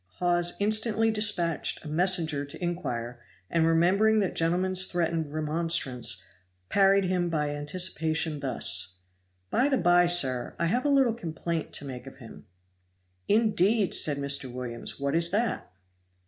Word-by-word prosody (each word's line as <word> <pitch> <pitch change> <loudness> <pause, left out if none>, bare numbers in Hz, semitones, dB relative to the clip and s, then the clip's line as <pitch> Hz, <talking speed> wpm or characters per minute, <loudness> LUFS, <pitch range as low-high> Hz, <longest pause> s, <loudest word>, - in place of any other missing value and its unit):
Hawes 175 -1 0
instantly 215 +1 0
dispatched 205 -9 0
a - - -7
messenger 160 -2 +1
to 140 - -11
inquire, 125 -9 -4 0.3
and 165 -1 +2
remembering 190 +7 +3
that 200 -4 0
gentleman's 185 +3 +2
threatened 165 -3 -2
remonstrance, 150 - +1 0.5
parried 195 0 +3
him 180 -1 -1
by 150 -3 -2
anticipation, 160 0 -1
thus: 130 -8 -3 0.6
"By 260 +4 +2
the 270 - +1
by, 175 -3 +3
sir, 135 -8 +1
I - - -1
have 245 - -1
a - - +2
little 270 -4 +3
complaint 170 -5 -5
to 145 - -2
make 130 -1 -8
of 135 - -12
him." 120 -4 -14 0.8
"Indeed!" 210 -2 +2
said 145 -2 +4
Mr. 140 -2 0
Williams, 120 0 -6
"what 140 0 -2
is 165 +1 +3
that?" 215 +3 -2
170 Hz, 140 wpm, -27 LUFS, 145-195 Hz, 0.8 s, said